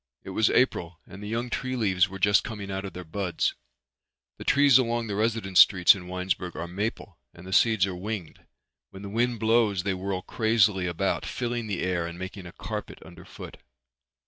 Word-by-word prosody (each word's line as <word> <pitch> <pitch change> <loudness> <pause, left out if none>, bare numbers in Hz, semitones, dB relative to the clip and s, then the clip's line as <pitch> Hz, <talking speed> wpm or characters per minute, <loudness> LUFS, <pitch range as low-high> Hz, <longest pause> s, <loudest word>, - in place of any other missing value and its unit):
It 95 - -8
was 110 +3 +2
April 85 -9 +1
and 95 +2 -12
the 105 - -7
young 120 +2 -3
tree 130 0 -2
leaves 95 -5 +2
were 95 - -7
just 100 +1 +3
coming 105 -4 -6
out 95 +1 -4
of 95 - -7
their 90 - -7
buds. 90 0 -2 0.8
The - - -8
trees 140 -2 +5
along 120 -2 0
the 105 - -4
residence 110 -3 +1
streets 90 -3 +7
in 90 -3 -9
Winesburg 90 -1 -3
are 85 - -5
maple 100 +6 -5 0.2
and 85 - -13
the 95 - -6
seeds 110 -3 +4
are 95 - -4
winged. 95 -2 -6 0.5
When 95 +1 -11
the 100 - -6
wind 120 +2 0
blows 110 -4 +2
they 95 - 0
whirl 95 0 -4
crazily 110 -5 +2
about, 90 +3 -1
filling 120 -2 -3
the 100 -4 -3
air 90 -2 -1
and 85 0 -8
making 95 0 -7
a - - -10
carpet - - -6
underfoot. - - -11
100 Hz, 195 wpm, -26 LUFS, 90-110 Hz, 0.8 s, streets